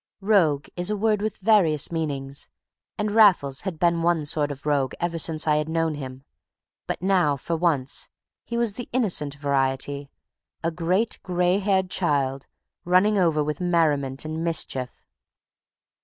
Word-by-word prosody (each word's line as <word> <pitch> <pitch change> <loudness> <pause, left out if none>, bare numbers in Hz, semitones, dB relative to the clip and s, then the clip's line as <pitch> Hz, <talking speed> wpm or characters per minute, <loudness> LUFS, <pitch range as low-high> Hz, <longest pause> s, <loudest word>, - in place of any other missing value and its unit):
Rogue 175 -9 +2
is 180 +2 -1
a 210 - -1
word 210 0 +1
with 215 -1 -2
various 185 -9 +2
meanings, 140 -4 -4 0.5
and 210 0 -1
Raffles 185 -11 +4
had 185 -4 -5
been 170 0 +2
one 165 -2 +1
sort 145 0 +1
of 140 0 -9
rogue 140 -3 0
ever 170 -1 -2
since 160 0 -1
I 150 -1 +3
had 150 +1 -2
known 165 -1 0
him; 135 -2 -8 0.6
but - - -4
now, 180 -7 +2
for 165 +5 -3
once, 155 -6 0 0.3
he 235 - -4
was 235 -3 0
the 245 +3 -8
innocent 175 - +1
variety, 140 0 -1 0.5
a 165 - 0
great 180 +7 0
gray 180 0 +1
haired 190 -2 0
child, 140 -6 0 0.4
running 190 +4 +3
over 160 -4 +2
with 150 +2 -4
merriment 150 -6 +1
and 160 +1 -4
mischief. 135 -6 -1
165 Hz, 155 wpm, -24 LUFS, 145-185 Hz, 0.6 s, Raffles